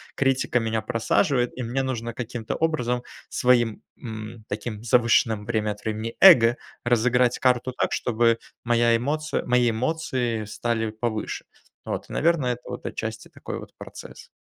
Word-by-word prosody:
критика 135 -2 +1
меня 110 -1 -1
просаживает, 125 - +1
и 130 - -5
мне 125 +3 -1
нужно 120 -3 -3
каким-то 115 -1 -4
образом 125 -7 0 0.2
своим, 120 -3 +2 0.2
м, 110 -1 -8
таким 105 +1 -5
завышенным 115 -2 +3
время 110 -2 0
от 105 0 -9
времени, 110 +1 -3
эго 120 -11 +8 0.3
разыграть 120 +1 +3
карту 125 0 +2
так, - - -1
чтобы 115 -1 +2 0.2
моя 120 -1 +3
эмоция 150 +6 -1
мои 125 -1 +3
эмоции 120 -3 -1
стали 115 +1 -2
повыше". 110 0 -3 0.4
Вот, - - -4
наверное, 150 -6 +1
это, 120 - -10
вот - - -7
отчасти - - -5
такой - - -7
вот - - -12
процесс. - - -11
120 Hz, 140 wpm, -25 LUFS, 110-125 Hz, 0.4 s, эго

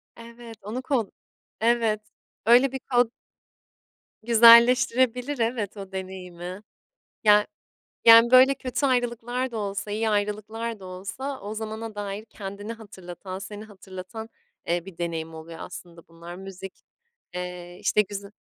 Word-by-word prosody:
Evet, 230 -1 -12
onu 225 +6 -5
kod 255 -6 0 0.5
Evet, 225 -2 +2 0.4
öyle 245 +3 +6
bir 265 - -4
kod 245 -3 +2 1.1
güzelleştirebilir, 245 +3 +6
evet, 225 -3 -1
o 195 -1 -8
deneyimi. 185 0 -7 0.6
Ya 210 -1 +5 0.6
yani 230 +1 +9
böyle 260 +2 +8
kötü 265 +2 -2
ayrılıklar 245 0 -1
da 225 - -5
olsa 200 0 -4
iyi 220 +1 0
ayrılıklar 215 +2 -2
da 190 - -11
olsa 205 +10 -6
o 205 +2 -5
zamana 220 0 -6
dair 205 +1 -5
kendini 205 +1 -7
hatırlatan 190 -3 -9
seni 205 +1 -8
hatırlatan, 200 +2 -9 0.4
eee, 175 +1 0
bir 190 -4 -11
deneyim 165 -2 -4
oluyor 160 +1 -10
aslında 170 -2 -10
bunlar 170 +1 -11
müzik, 190 0 -10 0.5
eee, 180 0 -6
işte, 210 - +3
güze 200 0 -7
210 Hz, 125 wpm, -25 LUFS, 190-235 Hz, 1.1 s, yani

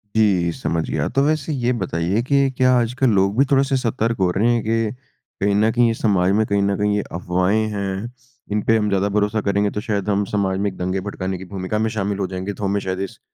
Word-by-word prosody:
जी 95 -6 +3
समझ 80 0 -2
गया, - - -1
तो 135 - +1
वैसे 155 0 0
ये 125 -3 0
बताइए 90 +3 -1
कि 140 +1 +2
क्या 130 0 +4
आजकल 125 +2 +1
लोग 100 0 +2
भी 135 - +6
थोड़े-से 135 0 +3
सतर्क 115 -2 -1
हो 95 -1 +3
रहे 105 +6 +2
हैं 120 - +1
कि 115 0 0 0.5
कहीं 100 0 +2
न 110 +2 +3
कहीं 120 0 +3
ये 115 - +1
समाज 95 -5 +1
में, 110 +2 +2
कहीं 100 0 +1
न 100 0 +1
कहीं 105 0 +1
ये - - +1
अफ़वाहें 90 +5 0
हैं, 100 +3 -4 0.4
इन 105 +1 +1
पे 115 - +5
हम 105 -1 0
ज़्यादा 100 0 +1
भरोसा 105 +1 +1
करेंगे, 100 0 +1
तो 105 - -3
शायद 105 -2 -2
हम 100 0 +2
समाज 95 -2 0
में 100 +1 +1
एक 95 - -14
दंगे 95 +1 -1
भड़काने 95 -1 -4
की 95 - -9
भूमिका 95 +2 -4
में 110 +1 +1
शामिल 100 -1 -1
हो 95 - -1
जाएँगे, 95 +2 -4
तो 105 - -8
हमें 100 +1 +1
शायद 95 -1 -3
इस - - -18
105 Hz, 245 wpm, -21 LUFS, 95-115 Hz, 0.5 s, भी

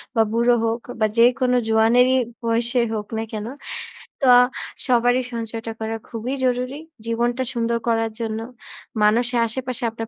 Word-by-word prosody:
বা 225 - +5
বুড়ো 235 +2 +3
হোক 230 +1 -1 0.2
বা 215 - +4
যেকোনো 250 +2 +4
জোয়ানেরই 230 +3 +4 0.3
বয়স 230 +1 +1 0.2
হোক 210 -2 -3
না 225 - -1
কেন। 215 0 -4 0.7
তো 265 - +3 0.6
সবারই 245 +1 +3
সঞ্চয়টা 225 0 -4
করা 225 0 -3
খুবই 235 +3 -4
জরুরী। 255 +3 -1 0.3
জীবনটা 240 +2 0
সুন্দর 235 0 0
করার 225 -1 +1
জন্য। 220 -1 -2 0.6
মানুষের 240 +3 +3
আশেপাশে 250 +1 -5
আপনার 225 0 -6
230 Hz, 135 wpm, -22 LUFS, 225-245 Hz, 0.7 s, বা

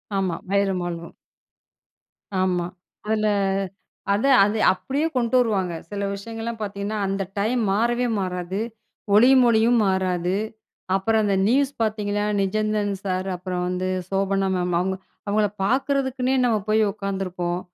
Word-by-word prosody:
ஆமா. 185 -3 0
"வயலும் 195 -2 +1
வாழ்வும்" 170 -1 -6 1.3
ஆமா. 180 -2 +1 0.4
அதில 215 -1 +1 0.9
அத 210 +6 0 0.2
அது 210 +2 +1
அப்டியே 280 +10 -2
கொண்டு 235 0 +1
வருவாங்க. 195 -7 +1 0.2
சில 200 -1 -4
விஷயங்கள்லாம் 225 +2 -5
பார்த்தீங்கன்னா, 205 +1 -3
அந்த 195 0 -1 0.2
டைம் 230 +4 +1
மாறவே 240 +4 +1
மாறாது, 180 +1 -3 0.6
"ஒளியும் 255 +3 +7
ஒலியும்" 230 +1 +4
மாறாது. 185 -1 0 0.6
அப்புறம் 220 +3 +2
அந்த 200 -1 +2
நியூஸ் 270 +3 +3
பார்த்தீங்கன்னா, 210 -1 0 0.2
"நிஜந்தன் 210 0 0
சார்" 185 0 -2
அப்புறம் 180 0 -3
வந்து, 185 +1 -2 0.2
"சோபனா 195 0 +1
மேம்" 180 -1 0
அவங்க 190 +1 0 0.3
அவங்கள 210 +1 +2 0.2
பார்க்குறதுக்குன்னே 265 +1 +1
நம்ம 225 -3 +3
போய் 220 +1 +4
உட்காந்துருப்போம். 185 -3 -3
200 Hz, 120 wpm, -23 LUFS, 190-225 Hz, 1.3 s, ஒளியும்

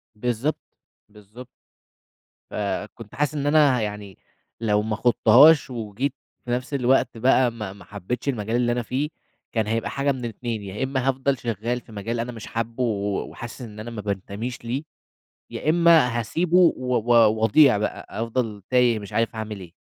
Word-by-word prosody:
بالضبط. 125 +6 -1 0.5
بالضبط. 105 +4 -13 1.0
فكنت 105 +2 -5
حاسس 150 0 0
إن 145 0 -1
أنا 145 -4 +5
ه - - -2
يعني 105 -3 -5 0.4
لو 105 -2 +2
ما 110 0 -2
خُضتهاش، 125 +6 +6
وجيت 120 +3 -3 0.3
في 120 - -4
نفس 125 +3 -2
الوقت 130 -2 +2
بقى 125 0 +3
ما 105 -4 -6
ما 100 -3 -15
حبيتش 105 +8 -4
المجال 110 -2 -2
اللي 120 -1 +2
أنا 120 0 0
فيه، 140 +6 -2 0.4
كان 110 -2 0
هيبقى 115 +1 -1
حاجة 140 0 0
من 130 -2 -4
الإتنين 115 -1 -4
يا 100 +6 -5
إمّا 130 -1 -1
هافضل 135 0 0
شغال 120 +2 -3
في 115 - -18
مجال 115 +3 -4
أنا 120 +1 -3
مش 115 -2 -9
حابه 115 +2 -3
و 100 -3 -1
وحاسس 120 +2 -9
إن 110 -3 -9
أنا 115 +2 -7
ما 110 -2 -6
بانتميش 100 +5 -5
ليه، 130 +6 -2 0.7
يا 155 - -1
إمّا 160 -8 +4
هاسيبه 165 - 0 0.2
و 125 -1 -2
و 120 +1 +1 0.3
واضيع 120 +1 +5
بقى، 105 - -3
أفضل 115 -3 -3
تايه 125 -3 +3
مش 100 -2 -10
عارف 115 0 0
هاعمل 105 -2 -5
إيه. 85 -3 -12
115 Hz, 170 wpm, -24 LUFS, 105-130 Hz, 1.0 s, خُضتهاش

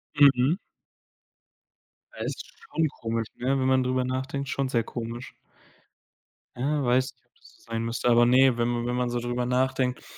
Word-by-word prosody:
Mhm. 140 +3 +5 1.6
Ja, - - -4
ist - - -5 0.3
schon 160 -1 +2
komisch, 115 -1 -2
ne, 125 - -4
wenn 130 - +1
man 130 -1 +3
drüber 130 0 0
nachdenkt, 130 +2 -3
schon 135 -1 -1
sehr 115 -3 +1
komisch. 120 +1 -6 1.2
Ja, 145 +3 0
weiß 130 +2 +2
nicht, 120 -1 -40
ob 120 - -45
das - - -19
so - - -26
sein 115 0 -1
müsste, 115 +1 -1
aber 120 0 +6
ne, 130 0 +5
wenn 120 0 +1
man 120 0 -1
wenn 125 0 -1
man 125 0 0
so 120 0 -1
drüber 120 +1 -2
nachdenkt, 130 0 0
125 Hz, 175 wpm, -26 LUFS, 120-130 Hz, 1.6 s, aber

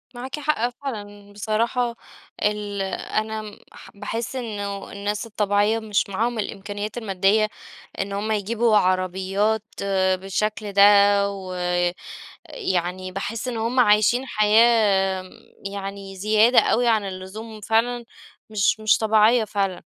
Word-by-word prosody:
معاكِ 260 +4 -6
حق 290 -5 0
فعلًا، 205 -6 -8
بصراحة 230 +4 -1 0.5
ال 205 -1 -1
أنا 215 +2 -3 0.3
باح - - -14
باحس 230 +5 -4
إنه 205 -5 -5
الناس 205 +2 -3
الطبيعية 210 0 +1
مش 210 -2 -1
معاهم 225 +4 -1
الإمكانيّات 205 +1 -5
المادّية 210 0 +2 0.5
إن 200 +1 -3
هُم 210 +2 -2
يجيبوا 220 +2 +1
عربيات 190 +3 +1 0.2
آآ 190 -1 +1
بالشكل 205 +2 -3
ده، 200 0 +5 0.5
و 190 -2 -7 1.0
يعني 185 - -3
باحس 215 +5 -4
إن 240 - -3
هُم 235 +3 +1
عايشين 215 +4 +4
حياة 210 -4 +3 0.5
يعني 195 -1 -7
زيادة 215 +5 +4
أوي 240 +1 +2
عن 220 -3 +2
اللزوم 200 +4 -8
فعلًا 230 +3 0 0.5
مش 215 +1 +1
مش 215 0 +3
طبيعية 220 +1 +4
فعلًا. 195 -3 -2
210 Hz, 115 wpm, -23 LUFS, 195-225 Hz, 1.0 s, ده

